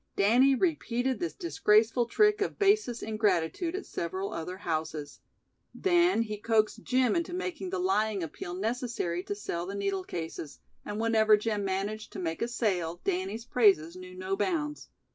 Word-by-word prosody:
Danny 250 +7 +5
repeated 265 -6 0
this 345 - -3
disgraceful 230 - +2
trick 420 - +3
of 405 - -1
basest 400 - +2
ingratitude 215 - 0
at 385 - -5
several 190 +4 -4
other 180 +3 -5
houses. 155 -4 -4 0.6
Then 350 -8 +3
he 215 -2 -5
coaxed 220 0 +1
Jim 255 -2 +2
into 340 +1 -1
making 370 -1 -4
the 380 - -2
lying 220 - +1
appeal 175 +2 -6
necessary 225 -4 -2
to 205 - -4
sell 175 -4 -4
the 200 - -5
needle 195 -1 -1
cases, 160 -4 -6 0.3
and 210 +1 -5
whenever 220 -1 +4
Jim 210 -1 -1
managed 200 +3 -3
to 200 - -6
make 165 -3 -3
a 230 - +1
sale 180 -8 -1
Danny's 195 +4 -2
praises 195 -10 +3
knew 185 0 -10
no 185 +1 -2
bounds. 300 - -2
215 Hz, 160 wpm, -29 LUFS, 185-260 Hz, 0.6 s, Danny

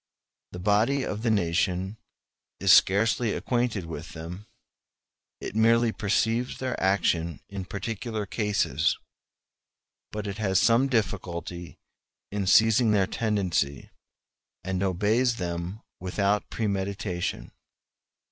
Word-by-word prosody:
The - - -7
body 105 +9 +2
of 105 -3 -4
the 115 - 0
nation 90 0 0 0.6
is 95 -1 +6
scarcely 110 +3 +4
acquainted 120 -7 -1
with 80 0 -7
them; 90 +6 -8 0.9
it - - -6
merely 115 +1 +4
perceives 115 +4 0
their 130 -1 -2
action 85 -4 +1
in 100 -2 -5
particular 110 +2 -4
cases; 105 0 0 1.1
but 105 0 -4
it 100 +1 -5
has 95 -3 +2
some 120 +3 +4
difficulty 90 - -3 0.5
in 100 -2 -2
seizing 110 +4 +5
their 100 -3 +3
tendency, 95 -10 -1 0.7
and 95 0 -2
obeys 105 +6 +2
them 90 +1 -4 0.2
without 100 +3 0
premeditation. 100 -4 -3
100 Hz, 105 wpm, -27 LUFS, 90-110 Hz, 1.1 s, is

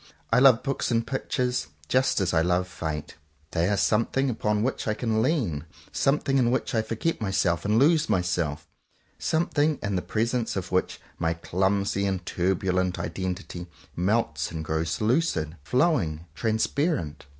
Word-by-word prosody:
I 125 - +6
love 130 -3 +6
books 135 - -1
and 115 -1 +1
pictures, 125 -1 -1 0.2
just 130 -2 +2
as 90 -1 0
I 80 - +4
love 90 +2 +1
Fate. 80 -4 -5 0.3
They 85 +2 +1
are 105 - +1
something 115 +6 +2
upon 105 -2 0
which 130 -1 -2
I 110 - +1
can 110 -1 0
lean; 110 - 0 0.3
some 135 +2 +2
thing 135 -2 +1
in 120 -2 +3
which 130 +2 -1
I 110 - +3
forget 115 +7 -2
myself 95 -4 0
and 105 +2 +2
lose 150 +3 +4
myself; 85 -5 0 0.5
something 155 -2 +1
in 100 -2 -1
the 90 - 0
presence 115 +3 -1
of 95 -2 -4
which 90 0 0 0.2
my 80 0 0
clumsy 100 +3 0
and 95 -2 -2
turbulent 90 0 0
identity 90 +1 -4 0.3
melts 105 +7 0
and 80 -1 -5
grows 80 +3 -1
lucid, 110 - +1
flowing, 90 - +1
transparent. 110 - -1
100 Hz, 155 wpm, -26 LUFS, 90-125 Hz, 0.5 s, I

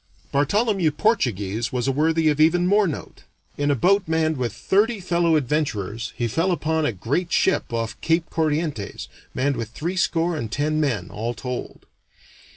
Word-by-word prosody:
Bartholomew 190 - +2
Portuguese 115 - 0
was 125 0 -1
a - - +3
worthy 160 +3 +2
of 150 0 +1
even 175 +3 +4
more 205 +2 +4
note. 155 - -6 0.3
In 145 0 0
a 145 - +3
boat 195 - +3
manned 160 -1 +1
with 125 -4 -2
thirty 205 - +1
fellow 170 -2 +2
adventurers 120 -7 -1
he 120 - 0
fell 165 - 0
upon 160 -2 0
a - - 0
great 140 - -2
ship 190 - +2
off 115 -1 -3
Cape 165 0 +1
Corrientes, 155 -8 -2 0.3
manned 140 +1 0
with 115 -2 -4
threescore 170 +3 0
and 115 -8 -4
ten 150 +4 0
men, 105 -11 -1
all 115 +4 -3
told. 125 0 -6
155 Hz, 160 wpm, -23 LUFS, 120-170 Hz, 0.3 s, even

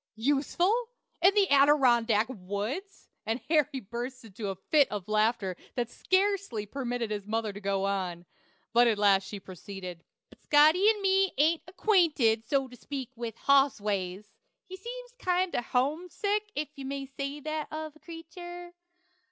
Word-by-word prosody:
"Useful! 345 - +1 0.3
in 380 +4 +5
the 405 -2 +4
Adirondack 250 -6 +5
woods!" 230 - -5 0.2
And 225 +3 -2
Harry 295 -3 +2
burst 240 +3 -6
into 205 0 -6
a 195 - -3
fit 280 - +3
of 205 -3 -5
laughter 215 -3 +1 0.2
that 240 -2 -2
scarcely 380 - 0
permitted 245 -1 -3
his 205 -1 -4
mother 220 -1 -1
to 205 - -8
go 195 -1 0
on; 185 -3 -2 0.5
but 240 +1 +6
at 225 -2 +2
last 195 -2 +3
she 205 - -6
proceeded: 185 -2 -9 0.3
"But - - -19
Scotty 310 +7 +5
and 420 -2 0
me 385 0 +3
ain't 315 +3 +3
ackwainted 315 - +2
So 270 -2 +1
to 250 - -13
speak 265 0 -6
with 230 -2 -5
Hoss 275 -2 +4
ways; 200 0 -3 0.3
he 375 - -8
seems - - -8
kinder 360 - 0
Hum 285 +9 -1
sick 415 +3 -1
if 295 0 -2
you 275 - -8
may 275 0 -4
say 275 +2 -5
that 310 +1 -3
of 310 -1 -6
a - - -19
Cretur. 350 +2 -9
270 Hz, 160 wpm, -29 LUFS, 215-335 Hz, 0.5 s, but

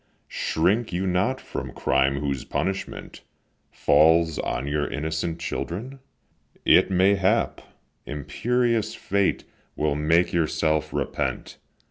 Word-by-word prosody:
shrink 105 +8 0
you 90 +2 -1
not 95 +9 +1
from - - -6
crime 70 +1 +1
whose 70 -3 -2
punishment 95 0 -4 0.5
Falls 80 0 +3
on 65 +3 -2
your 75 +1 -1
innocent 80 +2 -3
children? 115 +10 -5 0.7
it - - +5
may 95 +1 +4
hap 95 -1 +1 0.5
Imperious 115 - -1
Fate 100 0 0 0.3
will 75 -1 0
make 80 +4 +2
yourself 80 -2 0
repent. - - -3
85 Hz, 105 wpm, -24 LUFS, 75-100 Hz, 0.7 s, it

